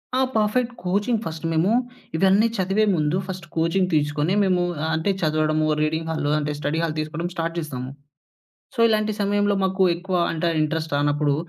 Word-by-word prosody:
ఆ! - - +2 0.2
Perfect 230 +3 +1
coaching 205 +5 0
first, 160 -2 -6
మేము 165 +6 +2 0.5
ఇవన్నీ 195 +5 +4
చదివే 195 +3 +2
ముందు 155 +2 +1
ఫస్ట్ 185 -2 -6
కోచింగ్ 165 +3 +1
తీసుకొని, 150 +3 +1
మేమూ 185 -2 +2 0.3
అంటే, 160 +5 +1
చదవడము 155 -1 +1 0.2
రీడింగ్ 160 +1 -1
హాల్లో 150 -2 -1
అంటే, 150 0 -2
స్టడీ 150 +2 -1
హాల్ 160 -2 -1
తీసుకోడం 155 +3 -3
స్టార్ట్ 165 0 -3
చేస్తాము. 130 -5 -5 0.9
సో, - - -7
ఇలాంటి 215 -1 +1
సమయంలో 205 0 +1
మాకు 190 0 +1
ఎక్కువ 185 +2 -4 0.2
అంటే, 165 +1 -2
ఆ - - -3
ఇంట్రస్ట్ 155 0 -2
రానప్పుడు, 145 0 +1
165 Hz, 160 wpm, -23 LUFS, 155-195 Hz, 0.9 s, ఇవన్నీ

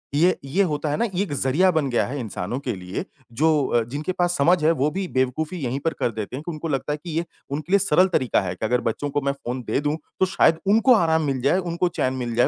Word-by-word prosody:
ये 175 +5 +3
ये 175 +9 +2
होता 150 -3 -1
है 145 - 0
ना, 235 - +1
ये 195 -3 -1
एक 190 - -7
ज़रिया 145 +7 +2
बन 155 -5 0
गया 120 - +1
है 140 +3 -4
इंसानों 110 0 -4
के 135 -3 -3
लिए 90 0 -5 0.3
जो 150 +3 +2
अ, 120 - +2
जिनके 145 +9 -4
पास 175 -1 0
समझ 165 +3 +3
है 160 - +5
वो 150 -2 +1
भी 190 +3 -3
बेवकूफ़ी 140 +5 -1
यहीं 130 +2 -2
पर 165 - +1
कर 120 - +1
देते 110 +2 -5
हैं 145 - -6
कि 175 - -3
उनको 155 +1 -5
लगता 145 0 -1
है - - -3
कि 175 - -7
ये 170 - 0 0.2
उनके 150 +4 -5
लिए 200 - +6
सरल 185 -1 +4
तरीका 130 - +1
है 90 -2 -3
कि 100 - -4
अगर 125 +2 +1
बच्चों 130 +6 -2
को 145 +1 -1
मैं 140 0 0
फ़ोन 130 -2 -5
दे - - +1
दूँ, 150 +1 -1 0.2
तो 190 - +5
शायद 175 -3 +3
उनको 225 +6 +5
आराम 160 -5 +2
मिल 135 -3 -1
जाए, 140 +7 +3
उनको 175 0 -1
चैन 130 -6 -1
मिल 120 -3 -3
जाए 120 - +4
150 Hz, 275 wpm, -23 LUFS, 130-175 Hz, 0.3 s, लिए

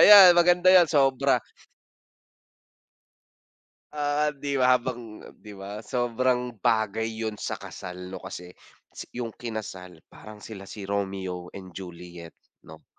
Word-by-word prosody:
Ayan 195 -4 +10
maganda 175 +1 +4
'yan, 175 -3 +7
sobra. 135 -2 +3 2.5
Ah, 150 0 0
'di 140 -1 -2
ba 125 0 +6
habang 120 -3 -7
'di 105 -2 -11
ba 100 +2 -7
sobrang 125 +1 0
bagay 110 0 +1
'yon 110 -1 -5
sa - - -3
kasal 90 0 -9
'no 95 - -6
kasi 90 0 -8 0.6
'yong 120 -2 -4
kinasal, 95 -8 -7
parang 105 -1 -12
sila 100 -3 -9
si 105 - -8
Romeo 95 -3 -3
and 95 -2 -10
Juliet 85 -2 -10 0.3
'no - - -13
110 Hz, 120 wpm, -26 LUFS, 95-130 Hz, 2.5 s, Ayan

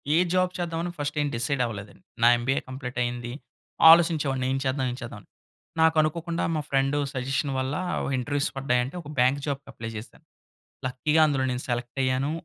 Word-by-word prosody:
ఏ - - +5 0.2
job 185 0 +2
చేద్దాం 170 0 -2
first 145 +1 -2
ఏం 145 - +1
decide 125 +3 0
అవ్వలేదండి. 105 -3 -8 0.2
నా - - +8
ఎంబీఏ 130 +3 0
కంప్లీట్ 130 -1 -6
అయింది. 120 0 -4 0.6
ఆలోచించేవాడిని 155 -6 +4
ఏం 135 - +1
చేద్దాం? 130 0 0
ఏం 125 - -6
చేద్దాం? 120 - -7
అని. - - -27 0.5
నాకు 160 0 +5
అనుకోకుండా 165 +2 -2
మా 155 - 0
ఫ్రెండ్ 135 +1 +1 0.2
సజెషన్ 135 +2 -1
వల్ల 130 +2 -2 0.4
ఇంటర్వ్యూస్ 145 +3 -1
పడ్డాయంటే, 130 +2 0
ఒక 145 - -11
బ్యాంక్ 130 +3 +4
జాబ్‌కి 140 -1 -4
అప్లై 115 0 -7
జేసా. 105 +2 -9 0.7
లక్కీగా 150 +5 +1
అందులో 135 -3 0
నేను 125 +1 -3
సెలెక్ట్ 120 +2 -3
అయ్యాను. 130 +3 0
135 Hz, 170 wpm, -26 LUFS, 125-150 Hz, 0.7 s, నా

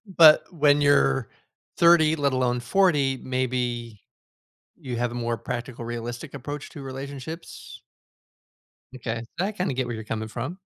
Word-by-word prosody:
But 165 -5 +7
when 145 -3 +4
you're 70 - +3 0.5
30, 165 -2 +6
let 140 -3 +1
alone 125 -1 +1
40, 145 -2 +2
maybe 125 -4 -2 0.8
you 125 -3 -6
have 120 0 -1
a - - -7
more 120 -1 -1
practical 120 0 -5
realistic 120 +4 -6
approach 145 +2 -6
to 145 - -9
relationships. 135 +4 -8 1.1
M'kay, 115 -2 -4 0.2
I 195 +4 0
kinda 185 -7 -2
get 130 0 -1
where 120 - -4
you're 110 - -6
coming 110 0 -4
from. 130 - -5
130 Hz, 140 wpm, -25 LUFS, 120-145 Hz, 1.1 s, But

